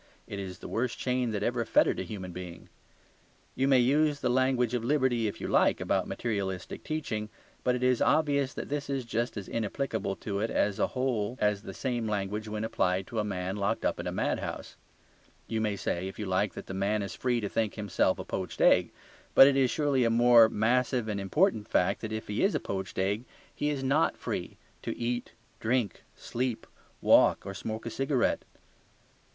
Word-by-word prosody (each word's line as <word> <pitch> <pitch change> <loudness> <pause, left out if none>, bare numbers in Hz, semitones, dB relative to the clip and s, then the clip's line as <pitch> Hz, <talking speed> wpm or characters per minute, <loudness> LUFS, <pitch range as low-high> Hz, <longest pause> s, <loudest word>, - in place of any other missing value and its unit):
It 100 - -6
is 95 -2 -6
the - - -9
worst 120 +1 -1
chain 125 -1 0
that 105 -2 -2
ever 120 +1 0
fettered - - +3
a - - -1
human 95 0 -6
being. 90 -1 -9 0.9
You 135 +1 +1
may 135 -1 +5
use 145 +4 +3
the 125 - 0
language 125 -2 +2
of 120 -2 -1
liberty, 125 -4 +2
if 100 - -5
you - - -4
like, - - +3
about - - 0
materialistic 100 -5 -3
teaching, 110 -9 -3 0.3
but 125 - +2
it 125 - -3
is 125 -1 +3
obvious 140 -3 +2
that - - -5
this 145 -1 -3
is 135 -3 -2
just 115 0 -2
as 100 - -5
inapplicable 110 -2 -2
to 100 -1 -4
it 110 +2 0
as 100 -1 0
a - - +3
whole 125 -3 0
as 105 -1 +1
the 95 - -8
same 120 -4 -2
language 105 +1 -2
when 105 0 -3
applied 95 -4 0
to 115 - -4
a - - +1
man 95 -1 -3
locked 100 +2 -1
up - - 0
in - - -4
a - - -1
mad - - 0
house. - - -6 0.7
You 110 -1 -2
may 105 -2 0
say, 95 -2 -2
if 95 - -8
you 105 - -4
like, 95 +2 0
that - - -7
the - - -7
man 100 +2 0
is 100 - -5
free 125 -2 0
to 105 - -2
think 110 0 -1
himself 105 -3 +1
a - - -6
poached - - -4
egg. - - +5 0.5
But - - +11
it 140 0 +4
is 135 -2 +3
surely 145 -3 +1
a 115 - +3
more 115 -1 +6
massive 120 +1 +1
and 105 -1 -2
important 110 - +1
fact 90 - +1
that 110 - -5
if 110 0 -4
he 105 +1 -2
is 200 - +3
a - - +1
poached 95 -1 -5
egg 100 +4 0 0.3
he 145 - -1
is 140 -2 -2
not 140 +5 +2
free - - -4 0.2
to - - -4
eat, 120 +1 -3 0.3
drink, 115 -1 0
sleep, 125 -1 -3 0.4
walk, - - +5
or 100 - -5
smoke 110 +3 -5
a 115 - -4
cigarette. 135 -2 +1
115 Hz, 205 wpm, -29 LUFS, 100-130 Hz, 0.9 s, But